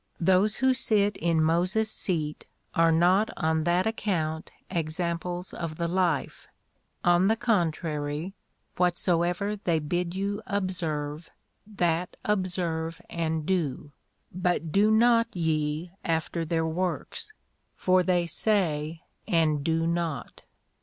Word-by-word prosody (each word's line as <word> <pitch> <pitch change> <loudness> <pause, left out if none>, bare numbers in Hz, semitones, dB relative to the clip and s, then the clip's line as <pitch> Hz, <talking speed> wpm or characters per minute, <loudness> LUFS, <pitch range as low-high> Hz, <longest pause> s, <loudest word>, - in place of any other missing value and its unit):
Those 190 +4 +3
who 260 +2 +3
sit 210 -5 +2
in 165 -1 +2
Moses' 180 +7 +1
seat 155 -5 -3 0.3
are 165 0 +4
not 180 +6 +4
on 160 -2 +1
that 175 +2 +2
account 165 -8 -1 0.2
examples 170 +1 -3
of 165 -2 -5
the 170 - -1
"life;" 175 -4 -1 0.6
on 175 +2 +4
the 220 - +3
contrary, 165 -6 -1 0.4
"whatsoever 180 +3 +1
they 175 -5 0
bid 175 +3 -2
you 200 +2 -2
observe, 165 -6 -2 0.4
that 175 -4 -1
observe 175 -5 -1
and 160 -2 -1
do; 150 -6 -1 0.4
but 175 -3 -1
do 205 +4 +4
not 230 +1 +5
ye 155 0 -1
after 165 0 -1
their 160 0 0
works, 180 - -3 0.4
for 185 0 +3
they 180 -1 +2
say 165 -4 0 0.3
and 155 -4 +2
do 165 +1 +1
not." 165 -6 -2
175 Hz, 115 wpm, -27 LUFS, 160-190 Hz, 0.6 s, not